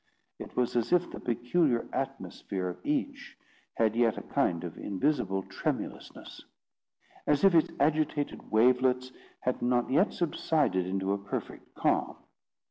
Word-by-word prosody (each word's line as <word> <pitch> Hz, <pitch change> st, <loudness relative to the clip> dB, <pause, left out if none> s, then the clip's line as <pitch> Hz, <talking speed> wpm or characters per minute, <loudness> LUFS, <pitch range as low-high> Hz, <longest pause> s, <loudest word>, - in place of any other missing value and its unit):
It -, -, -9 dB
was 125 Hz, -1 st, +1 dB
as 120 Hz, -2 st, 0 dB
if 180 Hz, 0 st, +3 dB
the -, -, -7 dB
peculiar 120 Hz, +2 st, +1 dB
atmosphere 95 Hz, -2 st, -3 dB
of 90 Hz, -, -9 dB
each 280 Hz, -1 st, -3 dB, 0.4 s
had 110 Hz, -1 st, +2 dB
yet 115 Hz, -2 st, +2 dB
a -, -, -5 dB
kind 85 Hz, 0 st, 0 dB
of 85 Hz, -3 st, -6 dB
invisible 100 Hz, -2 st, 0 dB
tremulousness; -, -, -5 dB, 0.8 s
as 150 Hz, +3 st, +2 dB
if 195 Hz, -2 st, +6 dB
its 165 Hz, -2 st, +4 dB
agitated 150 Hz, 0 st, 0 dB
wavelets 125 Hz, +3 st, +3 dB, 0.3 s
had 125 Hz, -, -1 dB
not 125 Hz, 0 st, +1 dB
yet 175 Hz, +10 st, +4 dB
subsided 150 Hz, -, 0 dB
into 95 Hz, +1 st, -1 dB
a 100 Hz, -, -2 dB
perfect 100 Hz, 0 st, -6 dB
calm. -, -, +1 dB
125 Hz, 135 wpm, -29 LUFS, 100-155 Hz, 0.8 s, if